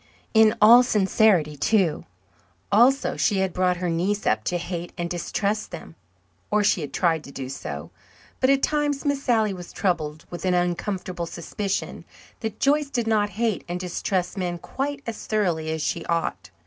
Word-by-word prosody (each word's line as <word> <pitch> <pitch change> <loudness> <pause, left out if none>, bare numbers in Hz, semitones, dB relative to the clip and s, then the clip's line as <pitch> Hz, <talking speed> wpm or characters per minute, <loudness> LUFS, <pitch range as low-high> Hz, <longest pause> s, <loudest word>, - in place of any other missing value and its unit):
In 220 -1 +6
all 230 +4 +9
sincerity, 195 -8 +3
too. 180 +2 +1 0.7
Also, 255 +6 +4
she 205 - +2
had 190 -2 0
brought 180 -1 +1
her 180 0 -2
niece 185 +5 -1
up 110 0 +1
to 175 - 0
hate 175 0 -5
and 175 -1 -2
distrust 200 +4 -2
them. 160 - -9 0.6
Or, 210 0 +2
she 195 - +2
had 145 - -5
tried 165 -3 +1
to 140 - -10
do 135 -2 -6
so. 75 - -6 0.5
But 260 - +3
at 275 0 +3
times 295 -2 0
Miss 285 -1 0
Sally 220 -6 +2
was 175 -2 -9
troubled 155 -4 -2
with 175 - -6
an 185 -1 +2
uncomfortable 180 0 -2
suspicion 195 +4 -4 0.4
that 220 -2 -5
Joyce 285 +1 +2
did 240 -4 -1
not 215 -2 +2
hate 225 -3 0
and 175 +1 -3
distrust 180 +1 -2
men 175 -1 -2
quite 275 +9 -4
as 230 -2 -6
thoroughly 175 -7 0
as 160 -1 -2
she 170 - -2
ought. 165 - -2
190 Hz, 175 wpm, -24 LUFS, 170-220 Hz, 0.7 s, all